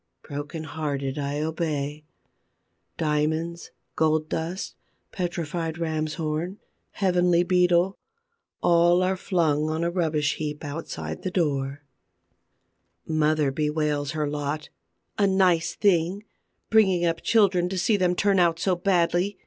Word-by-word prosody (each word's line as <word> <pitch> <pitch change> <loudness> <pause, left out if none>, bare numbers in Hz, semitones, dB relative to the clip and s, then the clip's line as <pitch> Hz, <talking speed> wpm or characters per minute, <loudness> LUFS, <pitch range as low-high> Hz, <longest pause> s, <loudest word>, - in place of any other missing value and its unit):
Broken 145 +2 -6
hearted, 145 -3 -3
I 145 +1 -2
obey. 150 -2 -3 0.9
Diamonds, 160 +3 -1 0.3
gold 155 0 +1
dust, 170 +4 -3 0.4
petrified 170 -2 -3
ram's 155 -2 -2
horn, 165 +3 -3 0.4
heavenly 180 -2 +3
Beetle, 180 +1 +2 0.6
are - - +2
all 175 +2 +4
flung 155 -5 +1
on 160 +1 -1
a 170 - 0
rubbish 155 -5 0
heap 150 0 -4
outside 80 - -5
the - - -2
door. 145 -5 -1 1.2
Mother 155 -2 +1
bewails 150 0 -1
her 155 -1 -1
lot: 145 +1 -3 0.5
"A 200 - +4
nice 185 -4 +2
thing, 190 0 +2 0.5
bringing 190 -6 +4
up 165 0 0
children 190 -5 +3
to 190 - -3
see 195 +5 +2
them 180 -2 +2
turn 195 0 +2
out 170 -2 +3
so 180 +2 +1
badly! 175 +1 +1
165 Hz, 120 wpm, -25 LUFS, 150-180 Hz, 1.2 s, all